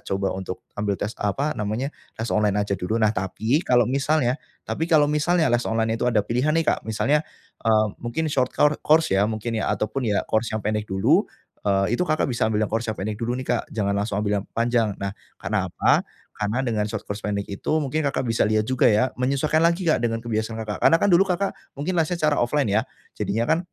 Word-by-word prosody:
coba 95 0 0
untuk 95 -1 -5 0.2
ambil 105 -1 0
tes 105 +2 -2
apa, 135 +9 0
namanya, 110 +6 -2 0.3
tes 115 0 -3
online 105 -1 +2
aja 100 -1 -1
dulu, 110 +6 -2
nah 110 - +4
tapi 110 - 0
kalau 120 -2 +4
misalnya 135 -1 +1 0.3
tapi 160 - -1
kalau 155 -3 +5
misalnya 160 +1 +2
les 120 +1 +2
online 110 0 0
itu - - -1
ada 110 -3 +3
pilihan 125 +7 +1
nih 165 - +1
Kak, - - +2
misalnya, 140 +7 +1 0.4
e 115 - +2 0.3
mungkin 120 +7 -2
short 130 -2 +1
kor 150 0 +3
course 160 -7 +4
ya 100 - +4
mungkin 110 +1 -3
ya - - 0
ataupun 110 +6 -2
ya 105 - +2
course 110 +1 0
yang 110 - -1
pendek 105 0 0
dulu, 95 0 +3 0.4
eee, 100 +3 +2
itu - - 0
Kakak 155 -4 0
bisa 120 - 0
ambil 105 -1 0
yang - - -4
course 115 +1 -1
yang - - -11
pendek 105 +2 -3
dulu 120 +1 -1
nih - - -7
Kak, 120 - +1
jangan 100 -2 0
langsung 100 0 -1
ambil 105 -1 0
yang - - -20
panjang. 115 -2 +1
Nah, 100 0 -2 0.3
karena - - -1
apa? - - +2 0.3
Karena 105 +5 -1
dengan 110 -3 0
short 105 -1 -5
course 100 +1 -5
pendek 100 -1 -1
itu 100 - -3
mungkin 150 +4 -1
Kakak 135 - -1
bisa 115 - +2
lihat 110 0 +2
juga 130 -1 +3
ya, 115 +4 +2
menyesuaikan 140 +5 +1
lagi 170 +2 +2
Kak, 155 - +3
dengan 115 -1 0
kebiasaan 110 0 -2
Kakak. 105 -1 -5
Karena 165 - +7
kan 205 - +3
dulu 185 +3 +6
Kakak 190 +2 0 0.2
mungkin 150 +7 -2
lesnya 170 +2 0
cara 150 -1 +2
offline 130 +1 +1
ya, 105 +2 +3 0.3
jadinya 115 +3 -1
kan, 160 - +3
115 Hz, 225 wpm, -24 LUFS, 105-140 Hz, 0.4 s, Karena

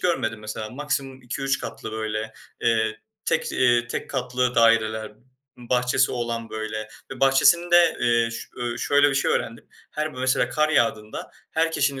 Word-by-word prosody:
görmedim 120 -11 0
mesela. 110 0 -6
Maksimum 135 -1 -3
2-3 135 +3 -2
katlı 110 - -7
böyle, 110 0 -3 0.3
eee, 110 -1 +1 0.2
tek, - - 0
iii, 120 -1 +3
tek 120 - -5
katlı 125 -1 -1
daireler, 110 -2 +3 0.4
bahçesi 125 +2 +1
olan 115 -2 -3
böyle 110 0 -4 0.2
ve 135 -1 -8
bahçesinde, 170 +6 +5
eee, 120 -1 +2
ş 115 - -7
ööö, 120 -1 -3
şöyle 145 0 +4
bir - - -2
şey 135 - +1
öğrendim. 115 +1 -2 0.2
Her 155 -1 -3
b - - -9
mesela 130 -1 +1
kar 155 +4 +1
yağdığında 110 -7 0 0.2
her 165 0 +1
kişinin 140 -3 0
120 Hz, 155 wpm, -24 LUFS, 110-135 Hz, 0.4 s, bahçesinde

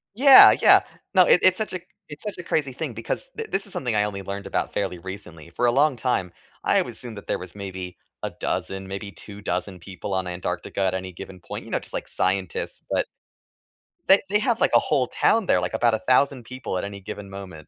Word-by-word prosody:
Yeah. 270 +3 +10
Yeah. - - +7 0.3
No. 185 - +7
It 180 - +6
it's 185 0 +6
such 215 -3 -2
a 185 - -2 0.3
it's 145 0 -6
such 210 -2 -5
a 180 - -7
crazy 150 -5 -1
thing 140 -1 -4
because 115 - -4
th 450 0 -5
this 195 0 0
is 200 - -5
something 120 -5 -1
I 105 - +3
only 100 -2 -3
learned 100 +1 -6
about - - -2
fairly 90 - -2
recently. 90 -4 -9
For 120 - -1
a 120 - +4
long 145 +1 +3
time, 110 -8 -1 0.3
I - - +3
wou - - -5
assumed 115 -4 -6
that - - -10
there - - -1
was 90 0 -9
maybe 95 -3 -7 0.3
a - - -2
dozen, 95 0 -3
maybe 100 +1 -6
2 100 +1 -12
dozen 90 0 -3
people 95 +2 -7
on 95 0 0
Antarctica 90 +2 -4
at 95 -1 +1
any 95 0 -5
given 95 +1 -10
point, - - -8
you - - -11
know, - - +1
just - - -12
like - - -4
scientists. 95 -2 -2
But - - 0 1.0
They 195 +1 +7
they 210 +1 +3
have 235 0 0
like - - +3
a - - +7
whole - - +1
town 225 -3 +2
there, 90 - +3
like 90 +2 -3
about 115 +1 +2
1000 125 +3 +2
people 130 -4 -5
at - - -3
any 100 0 -8
given 100 +1 -8
moment. 95 -6 -9
100 Hz, 230 wpm, -24 LUFS, 95-140 Hz, 1.0 s, Yeah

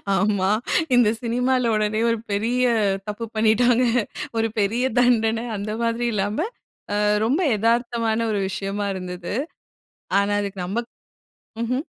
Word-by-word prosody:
ஆமா. 195 0 +1 0.5
இந்த 240 -4 +5
சினிமால 250 +1 +1
உடனே 215 +1 0
ஒரு 230 - +1
பெரிய 235 +5 +1 0.4
தப்பு 210 +2 -4
பண்ணிட்டாங்க 230 +3 +3 0.5
ஒரு 225 0 +2
பெரிய 225 +5 +1 0.2
தண்டன, 230 -1 +2
அந்த 210 +2 -4
மாதிரி 230 +1 0
இல்லாம, 210 - -1 0.5
அ - - +1 0.3
ரொம்ப 275 +10 +1 0.2
எதார்த்தமான 230 0 +1
ஒரு 205 - 0
விஷயமா 200 +1 -3
இருந்தது. 180 0 -5 0.9
ஆனா 200 +1 0
அதுக்கு 200 -2 -5
நம்ம 230 +6 -2 0.8
ம்ஹ்ம். 255 +5 -1
225 Hz, 120 wpm, -23 LUFS, 205-240 Hz, 0.9 s, இந்த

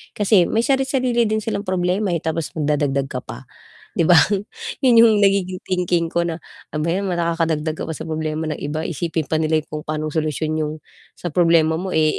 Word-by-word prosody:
Kasi 200 -4 +4
may 225 - +1
sari-sarili 260 -3 +1
din 215 0 -1
silang 210 -2 -3
problema 185 +1 0
eh, 165 - -3
tapos 160 0 -2
magdadagdag 145 -3 0
ka 125 - -3
pa, - - -9 0.5
'di - - +2
ba? 175 -1 +7 0.6
Yun 255 -3 +5
yung 230 -1 +6
nagiging 190 -2 +1
thinking 180 -2 0
ko 170 +1 0
na, 165 -1 -5 0.3
"Ano 150 - -1
ba 165 - -1
'yan, 195 +3 -1
nakakadagdag 165 -3 -1
ka - - -3
pa 160 - -4
sa - - -6
problema 155 0 -3
ng 155 - -4
iba, 150 +2 -3
isipin 160 -2 -3
pa 155 - +2
nila 155 0 +1
yung - - -31
kung - - -10
pa'nong 155 0 -2
solusyon 155 0 -1
yung 150 -1 -1 0.4
sa 175 - -5
problema 165 -1 +3
mo 185 +1 -4
eh, 155 -1 +2
165 Hz, 200 wpm, -21 LUFS, 155-185 Hz, 0.6 s, ba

